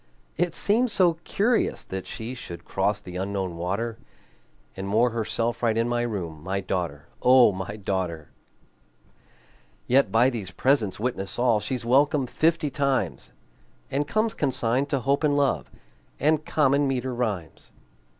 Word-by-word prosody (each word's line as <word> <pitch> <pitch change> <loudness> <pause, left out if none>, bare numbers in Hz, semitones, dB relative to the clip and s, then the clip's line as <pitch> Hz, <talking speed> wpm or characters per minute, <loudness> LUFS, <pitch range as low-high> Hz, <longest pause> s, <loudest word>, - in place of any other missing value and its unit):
It 175 +1 0
seemed 235 +5 +3
so 175 -6 +2
curious 230 +4 +1
that 95 0 -6
she 115 +3 -5
Should 85 -8 -9
cross 100 +2 0
the 90 -3 -8
Unknown 95 -2 -3
water, 100 +7 -3 0.8
And 95 +1 -5
moor 115 +4 +3
herself 115 +1 -1
right 115 -2 +1
in 115 +1 +2
my 120 0 0
room, 90 -10 -4
My 95 +4 -2
daughter, 85 -6 -3 0.2
O 125 -2 +6
my 95 +2 -5
daughter! 95 -6 -3 1.5
Yet 125 -5 +3
by 120 +5 +4
these 105 -7 -5
presents 110 -1 +1
witness 100 -5 -2
all 120 -3 +3
She's 125 +1 -3
welcome 140 +3 +3
fifty 155 +2 +1
times, 140 0 -1 0.6
And 145 +2 0
comes 215 0 0
consigned 130 -1 0
to 135 -2 0
Hope 140 +4 +1
and 145 -1 +3
Love 135 - +1 0.5
And 155 +1 +2
common 140 -1 +3
meter 130 -1 -1
rhymes. 105 -9 -4
120 Hz, 145 wpm, -25 LUFS, 95-140 Hz, 1.5 s, O